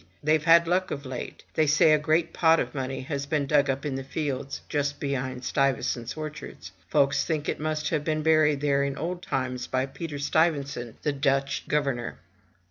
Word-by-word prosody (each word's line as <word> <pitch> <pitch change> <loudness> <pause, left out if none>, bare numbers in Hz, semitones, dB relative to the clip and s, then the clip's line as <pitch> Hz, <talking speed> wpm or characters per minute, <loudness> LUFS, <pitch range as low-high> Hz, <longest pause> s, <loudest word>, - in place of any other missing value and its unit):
TheyVe 155 0 +4
had 165 +2 +6
luck 185 +2 +1
of 140 0 -5
late. 130 -1 -6
They 155 -1 +2
say 155 +1 +5
a 155 - +4
great 160 +2 +1
pot 165 -1 +4
of - - -2
money 135 -1 -3
has 140 +1 -4
been 145 -1 0
dug 140 0 +3
up 135 +2 -1
in 145 - -2
the 135 0 -4
fields, 140 -1 -3
just 145 -1 -1
behind 130 -2 -3
Stuy 135 +1 +2
vesant*s 120 +3 -4
orchard. 155 -1 -6 0.3
Folks 140 -1 +3
think 155 -3 -2
it - - -2
must 155 0 -1
have 155 -3 0
been 155 0 -1
buried 155 -2 +4
there 140 -1 +2
in 140 -1 -2
old 175 +4 -3
times, 130 -5 -3
by 130 0 0
Peter 150 +2 -6
Stuy 160 +4 +3
vesant, 140 -6 -6
the 150 - +1
Dutch 135 0 0
governor. 140 -5 -1
145 Hz, 200 wpm, -27 LUFS, 135-155 Hz, 0.3 s, had